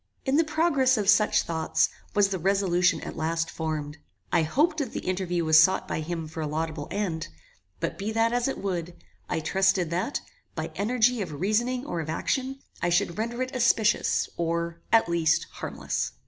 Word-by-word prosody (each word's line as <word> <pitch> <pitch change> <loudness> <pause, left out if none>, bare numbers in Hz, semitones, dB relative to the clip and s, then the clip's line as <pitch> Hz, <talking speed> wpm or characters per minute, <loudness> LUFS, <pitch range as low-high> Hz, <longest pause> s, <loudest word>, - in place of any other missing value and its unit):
In 270 0 +2
the 325 - +5
progress 300 -5 +2
of 205 -2 -1
such 210 +1 +4
thoughts, 160 -1 +1 0.3
was 205 -1 +4
the 190 -2 -2
resolution 185 0 +2
at - - -7
last 165 +1 -1
formed. 155 -2 -4 0.3
I - - +5
hoped 300 - +1
that 270 -6 -3
the - - -3
interview 180 -2 -1
was 155 0 +7
sought 185 +4 +4
by - - -2
him 165 0 -4
for 160 +1 -6
a 155 - -2
laudable 155 0 -3
end; 185 -6 -2 0.5
but, 165 +4 -3
be 205 +2 -2
that 225 +1 +2
as 245 +1 +1
it 270 - -2
would, 175 -3 -3 0.3
I - - 0
trusted 190 -1 +2
that, 180 +11 -1 0.4
by - - -4
energy 240 +2 +2
of 155 -7 -5
reasoning 240 - 0
or 175 - -3
of 155 -1 -4
action, 265 +10 -2 0.2
I 175 - +1
should 175 +1 +1
render 235 +3 -1
it 255 0 -7
auspicious, 230 -3 +2
or, 170 0 -2
at 225 -4 +5
least, 165 -2 +2
harmless. - - -3
185 Hz, 185 wpm, -27 LUFS, 165-230 Hz, 0.5 s, was